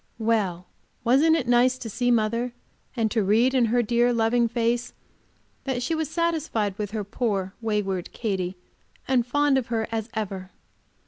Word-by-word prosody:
Well! 210 Hz, -6 st, 0 dB, 0.4 s
wasn't 280 Hz, +7 st, +4 dB
it 280 Hz, -7 st, -1 dB
nice 245 Hz, +1 st, +4 dB
to 245 Hz, -, -7 dB
see 245 Hz, +3 st, -1 dB
mother, 235 Hz, +1 st, +1 dB, 0.4 s
and 220 Hz, -2 st, +1 dB
to 225 Hz, -, +1 dB
read 225 Hz, +6 st, +3 dB
in 255 Hz, -3 st, +4 dB
her 240 Hz, +2 st, +2 dB
dear, 240 Hz, +2 st, +2 dB
loving 235 Hz, +1 st, +2 dB
face 235 Hz, +1 st, -1 dB, 0.7 s
that 255 Hz, -3 st, -1 dB
she 295 Hz, -, -1 dB
was 320 Hz, -2 st, -1 dB
satisfied 315 Hz, -, -1 dB
with 210 Hz, -1 st, -2 dB
her 210 Hz, 0 st, -3 dB
poor, 200 Hz, -2 st, -2 dB
wayward 205 Hz, -5 st, -2 dB
Katy, 190 Hz, -5 st, -2 dB, 0.5 s
and 255 Hz, -2 st, +3 dB
fond 290 Hz, +1 st, +3 dB
of 250 Hz, -, -6 dB
her 225 Hz, -2 st, -1 dB
as 225 Hz, 0 st, -3 dB
ever! 195 Hz, -3 st, -4 dB
230 Hz, 165 wpm, -25 LUFS, 210-250 Hz, 0.7 s, wasn't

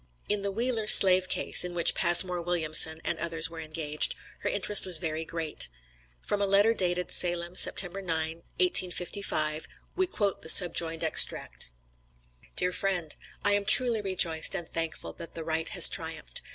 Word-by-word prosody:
In 210 Hz, -1 st, -3 dB
the 200 Hz, -, -4 dB
Wheeler 225 Hz, +1 st, -5 dB
slave 185 Hz, -2 st, +6 dB
case, -, -, 0 dB
in 180 Hz, -1 st, -9 dB
which 170 Hz, -, +4 dB
Passmore 175 Hz, 0 st, +3 dB
Williamson 160 Hz, -2 st, +3 dB
and -, -, -5 dB
others 165 Hz, -1 st, -2 dB
were 165 Hz, -, -11 dB
engaged, 155 Hz, -1 st, -2 dB, 0.2 s
her -, -, -5 dB
interest 205 Hz, +1 st, +1 dB
was 180 Hz, -3 st, +3 dB
very 160 Hz, 0 st, -6 dB
great. 160 Hz, -, -4 dB, 0.6 s
From 205 Hz, -, -5 dB
a 200 Hz, -, -1 dB
letter 200 Hz, +3 st, +1 dB
dated 180 Hz, -3 st, -4 dB
Salem, 175 Hz, -1 st, -1 dB
September 195 Hz, +1 st, +2 dB
9, 160 Hz, -2 st, -5 dB, 0.2 s
1855, 175 Hz, -, -2 dB, 0.3 s
we 375 Hz, 0 st, -2 dB
quote 205 Hz, -, -5 dB
the 160 Hz, -, -6 dB
subjoined 165 Hz, -2 st, +2 dB
extract: 160 Hz, -, +1 dB, 0.9 s
DEAR 180 Hz, 0 st, +1 dB
FRIEND: 180 Hz, -6 st, -5 dB, 0.3 s
I 205 Hz, -, +3 dB
am 205 Hz, 0 st, -1 dB
truly 235 Hz, +1 st, +7 dB
rejoiced 175 Hz, -5 st, 0 dB
and 170 Hz, -, -7 dB
thankful 165 Hz, -1 st, -7 dB
that 165 Hz, -, -13 dB
the 165 Hz, -, -8 dB
right 160 Hz, 0 st, -5 dB
has -, -, +3 dB
triumphed. -, -, -5 dB
175 Hz, 160 wpm, -25 LUFS, 160-195 Hz, 0.9 s, truly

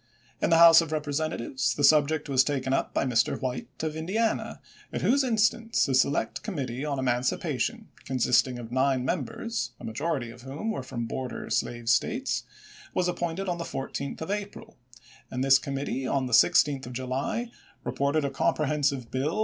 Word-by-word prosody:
In -, -, +2 dB
the 165 Hz, -, +5 dB
House 165 Hz, 0 st, +9 dB
of 165 Hz, -2 st, -5 dB
Representatives 145 Hz, -4 st, -1 dB
the 145 Hz, -, -2 dB
sub 145 Hz, 0 st, +6 dB
ject 155 Hz, -1 st, -2 dB
was 135 Hz, -2 st, +4 dB
taken 135 Hz, -2 st, -1 dB
up -, -, 0 dB
by -, -, 0 dB
Mr. 120 Hz, -3 st, +1 dB
White 125 Hz, -2 st, -3 dB, 0.2 s
of 155 Hz, -1 st, -2 dB
Indiana, 200 Hz, +8 st, -1 dB, 0.3 s
at -, -, -3 dB
whose 275 Hz, +2 st, +4 dB
instance 225 Hz, -3 st, +2 dB
a 135 Hz, -, 0 dB
select 130 Hz, -3 st, +1 dB
committee 135 Hz, -, -4 dB
on 145 Hz, -2 st, -2 dB
emancipa 125 Hz, -1 st, 0 dB
tion, -, -, -2 dB, 0.2 s
consisting 125 Hz, 0 st, +2 dB
of 120 Hz, -1 st, -8 dB
nine 130 Hz, 0 st, +1 dB
members, 145 Hz, -, -3 dB
a -, -, -13 dB
majority 130 Hz, +1 st, -2 dB
of 120 Hz, +1 st, -13 dB
whom 140 Hz, -, -4 dB
were 175 Hz, -, -3 dB
from 120 Hz, -2 st, -5 dB
border 130 Hz, +2 st, -5 dB
slave 120 Hz, -1 st, -1 dB
States, 120 Hz, -, +1 dB, 0.5 s
was 180 Hz, -, +2 dB
ap 175 Hz, -1 st, -2 dB
pointed 175 Hz, +3 st, -2 dB
on 175 Hz, -1 st, -2 dB
the -, -, -2 dB
14th 140 Hz, -1 st, -5 dB
of 160 Hz, -, -3 dB
April, 205 Hz, 0 st, -5 dB, 0.2 s
^ -, -, -23 dB, 0.3 s
and 130 Hz, +1 st, -2 dB
this 135 Hz, 0 st, +6 dB
committee 135 Hz, -1 st, -3 dB
on 135 Hz, -2 st, 0 dB
the 125 Hz, -, -4 dB
16th 140 Hz, 0 st, +4 dB
of 125 Hz, -, -7 dB
July 130 Hz, -, -3 dB, 0.3 s
reported 140 Hz, +2 st, 0 dB
a 140 Hz, -, -2 dB
comprehensive 140 Hz, -4 st, 0 dB
bill 145 Hz, +9 st, -1 dB
1862. -, -, 0 dB
140 Hz, 185 wpm, -27 LUFS, 130-165 Hz, 0.5 s, House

